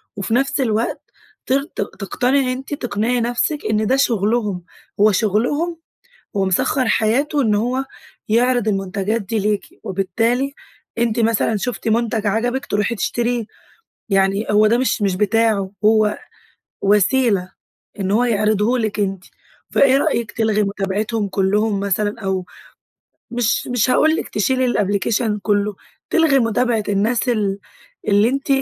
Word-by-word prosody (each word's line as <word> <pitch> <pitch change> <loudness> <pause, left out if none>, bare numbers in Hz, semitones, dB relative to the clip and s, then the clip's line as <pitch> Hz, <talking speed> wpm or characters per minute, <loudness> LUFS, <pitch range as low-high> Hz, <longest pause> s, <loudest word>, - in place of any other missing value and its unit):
وفي 200 +2 -3
نفس 270 +3 +1
الوقت 225 -2 -1 0.4
تر 275 +2 +1
ت 315 - -17
تقتنعي 255 +6 0
أنتِ 265 +3 -7
تقنعي 240 -2 -1
نفسك 245 +6 -1
إن 215 0 +1
ده 260 - +3
شغلهم، 215 -6 0 0.4
هو 210 +1 +5
شغلهم 240 - 0 0.6
ومسخر 195 +6 +1
حياته 275 +8 +1
إن 215 -5 +2
هو 250 +5 -1 0.4
يعرض 245 0 +2
المنتجات 195 +2 -1
دي 215 +3 -2
ليكِ، 210 0 -2
وبالتالي 225 +8 -1 0.4
أنتِ 235 0 0
مثلًا 225 -1 +1
شفتِ 240 +2 -4
منتج 225 -1 0
عجبِك 245 +6 -1
تروحي 210 +1 -1
تشتريه، 240 +2 -1 0.7
يعني 195 +1 +2
هو 210 +1 +5
ده 230 +2 +3
مش 230 -4 0
مش 195 -3 +1
بتاعه، 210 -1 +1
هو 215 -1 +3 0.7
وسيلة 205 -1 +2 0.5
إن 190 -1 -1
هو 225 +5 +3
يعرضهُ 215 +1 +1
لِك 215 -2 -2
أنتِ. 195 -2 -2 0.5
فإيه 270 -1 +4
رأيك 235 -4 -1
تلغي 220 -2 +1
متابعتهم 205 +2 -2
كلهم 200 +2 +1
مثلًا 205 +2 -1
أو 190 -2 -2 0.9
مش 240 -2 0
مش 245 -1 +1
هاقول 315 +5 +4
لِك - - -4
تشيلي 255 +5 +1
الأبلكيشن 210 0 0
كله، 205 0 0 0.3
تلغي 320 -5 +3
متابعة 230 -1 +1
الناس 220 +5 +1
ال 205 -4 0 0.5
اللي 205 +2 +4
أنتِ 275 +2 -3
220 Hz, 130 wpm, -19 LUFS, 205-245 Hz, 0.9 s, هو